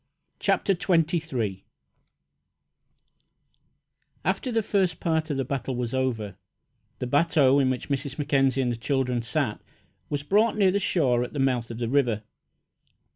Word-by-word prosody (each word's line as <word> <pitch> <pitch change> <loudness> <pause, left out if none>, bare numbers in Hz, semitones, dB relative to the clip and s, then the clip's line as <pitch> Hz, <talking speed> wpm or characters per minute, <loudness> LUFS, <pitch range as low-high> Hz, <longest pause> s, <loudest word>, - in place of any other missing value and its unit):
CHAPTER 195 - +2
XXIII 170 -2 +2 0.3
RESCUE 105 -7 -2 2.6
After 195 +8 0
the 225 -1 +1
first 190 -5 0
part 160 -1 0
of 145 - -1
the 135 - -1
battle 135 0 -3
was 120 -1 -3
over, 115 -7 -2 0.6
the - - -3
bateau 145 0 +3
in 135 -2 +3
which 130 +2 -3
Mrs. 140 -1 -2
Mackenzie 135 -2 +2
and 120 - 0
the 120 - -3
children 125 -1 0
sat 120 -1 -2 0.5
was 145 -1 -2
brought 215 +8 +2
near 195 -3 +4
the 200 - +1
shore 130 -11 +1
at 125 - -7
the - - -5
mouth 125 -3 +1
of 115 - -6
the 120 -1 -2
river. 120 -5 +1
135 Hz, 150 wpm, -26 LUFS, 125-160 Hz, 2.6 s, near